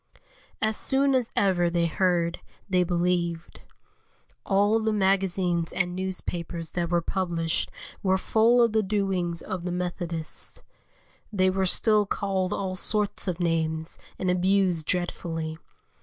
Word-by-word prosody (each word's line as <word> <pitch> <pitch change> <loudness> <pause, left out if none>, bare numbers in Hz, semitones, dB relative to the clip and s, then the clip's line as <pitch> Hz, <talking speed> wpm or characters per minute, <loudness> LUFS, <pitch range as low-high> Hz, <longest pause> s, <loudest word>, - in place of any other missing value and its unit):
As 220 0 +1
soon 275 +1 +3
as 250 -3 +1
ever 180 -3 +2
they 170 0 +1
heard, 170 0 +1 0.3
they 185 -2 +3
believed. 175 -1 -1 0.9
All 205 +3 +3
the 220 0 +1
magazines 190 -4 +1
and 180 0 -1
newspapers 175 -3 -4
that 170 -1 -2
were 170 -1 +1
published 170 -3 -1 0.3
were 190 -1 +2
full 230 +5 +4
of 230 - +2
the 220 0 +2
doings 190 -4 -1
of 185 -2 -5
the 180 - -3
Methodists. 175 -2 -3 0.7
They 185 -2 +2
were 190 0 0
still 210 +2 +3
called 190 -2 -1
all 190 -1 -2
sorts 205 +1 0
of 180 -1 -2
names 160 -1 -1 0.2
and 185 -1 0
abused 180 -3 +2
dreadfully. 165 -3 -2
180 Hz, 130 wpm, -26 LUFS, 170-195 Hz, 0.9 s, full